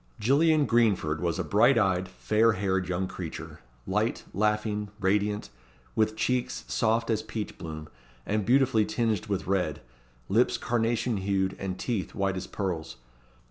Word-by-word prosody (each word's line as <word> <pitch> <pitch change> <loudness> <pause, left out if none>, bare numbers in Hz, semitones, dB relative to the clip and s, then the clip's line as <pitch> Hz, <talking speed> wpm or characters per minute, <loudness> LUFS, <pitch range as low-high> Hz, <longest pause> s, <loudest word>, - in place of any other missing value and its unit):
Gillian 150 +6 +4
Greenford 100 - +2
was 85 -2 0
a - - -1
bright 120 +5 +4
eyed, 95 -3 +2
fair 110 +4 +2
haired 95 -2 -1
young 90 +1 -1
creature; - - -7 0.3
light, - - 0
laughing, 105 0 0
radiant; 105 - 0 0.4
with 110 0 +2
cheeks 110 - -1
soft 115 +1 +1
as 110 -1 +1
peach 110 -1 -5
bloom, 80 -2 -7 0.4
and 105 0 0
beautifully 125 0 +4
tinged 110 -2 -1
with 100 -2 -2
red, 90 -6 0 0.5
lips 115 +5 +3
carnation 120 -1 0
hued, 95 -1 0
and 95 -1 -3
teeth 110 -7 -3
white 95 -1 0
as 95 - -5
pearls. 85 -5 -3
105 Hz, 140 wpm, -28 LUFS, 95-115 Hz, 0.5 s, Gillian